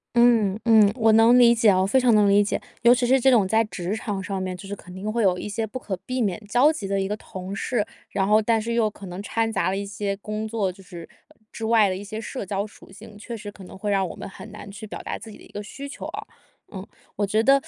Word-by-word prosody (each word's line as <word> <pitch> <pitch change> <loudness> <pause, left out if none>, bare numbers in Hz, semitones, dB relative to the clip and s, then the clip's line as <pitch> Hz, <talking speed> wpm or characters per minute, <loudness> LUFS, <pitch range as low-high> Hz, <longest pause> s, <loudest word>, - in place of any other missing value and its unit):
嗯， 230 -4 +4
嗯， 220 -3 +6
我 225 -3 +3
能 225 +3 +6
理 240 -1 +7
解 230 -2 +4
哦， 185 -1 +3
非 220 +7 +3
常 250 -2 +4
能 210 -1 +5
理 200 +1 +5
解。 205 - -2 0.2
尤 235 +1 +7
其 250 0 0
是 265 +2 +4
这 265 - +4
种 225 -7 +4
在 220 +3 +3
职 190 -1 -4
场 205 -3 -4
上 190 0 -3
面， 185 -1 -4
就 195 - -10
是 200 - -5
肯 180 -2 -13
定 195 +3 -4
会 235 +1 0
有 185 -4 +3
一 - - -5
些 220 +2 -3
不 235 - -6
可 215 -6 -4
避 255 0 -3
免 205 -5 0
交 250 +8 +4
集 205 -10 -5
的 195 0 0
一 195 - -1
个 210 - -2
同 190 -2 -8
事。 215 +1 -1 0.2
然 195 -1 0
后 215 +1 +5
但 225 +1 +2
是 230 +2 -3
又 230 -2 +2
可 200 -1 -12
能 180 +1 -6
掺 225 +2 -1
杂 220 - 0
了 190 - -1
一 200 - -3
些 200 0 -3
工 215 +1 -4
作， 215 -4 -1
就 190 +2 -16
是 175 -3 -10 0.2
呃， - - -22 0.2
之 225 - -8
外 220 -2 +4
的 185 - -2
一 195 - -7
些 215 +2 -6
社 240 +2 -5
交 195 +1 -2
属 215 - -16
性， 210 +2 -13
确 230 +2 -7
实 205 -1 -8
可 200 - -13
能 180 - -11
会 205 +1 -2
让 195 -2 +1
我 - - -8
们 - - -8
很 210 +2 -11
难 210 -1 -10
去 210 +2 -9
表 - - -7
达 - - -4
自 225 - -10
己 - - -12
的 - - -16
一 - - -17
个 205 - -5
需 275 +7 -8
求 280 - -8
啊。 - - -6 0.5
嗯， 190 -1 -7 0.3
我 205 - 0
觉 215 +2 +1
得 275 +4 +5
210 Hz, 310 characters per minute, -24 LUFS, 195-225 Hz, 0.5 s, 理